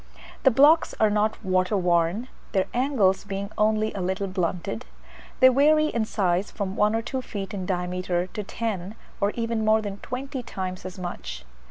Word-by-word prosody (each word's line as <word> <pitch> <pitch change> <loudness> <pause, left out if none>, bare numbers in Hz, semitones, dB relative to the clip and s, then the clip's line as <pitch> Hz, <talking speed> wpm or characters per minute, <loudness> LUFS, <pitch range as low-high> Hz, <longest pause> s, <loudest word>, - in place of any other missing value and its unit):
The 265 - +6
blocks 290 +7 +5
are 215 -1 +4
not 210 0 0
water 185 +2 +2
worn, 175 +5 +1 0.3
their 190 -2 +2
angles 240 -7 +2
being 200 0 -5
only 215 0 +2
a 195 - -4
little 190 +2 -1
blunted; 185 +3 -2 0.6
they 260 - +10
vary 305 +4 +4
in 230 -5 0
size 190 -2 0
from 195 -2 -4
one 210 +1 +3
or 225 - -1
two 260 +3 -3
feet 200 -6 -6
in 190 -3 -4
diameter 180 -1 -1
to 210 +3 -6
ten, 205 -2 -4 0.2
or 200 - +2
even 230 -1 -1
more 215 0 +4
than 205 -2 -5
twenty 265 +4 -5
times 185 -5 -5
as 185 +1 -7
much. 65 - -6
205 Hz, 175 wpm, -25 LUFS, 185-230 Hz, 0.6 s, they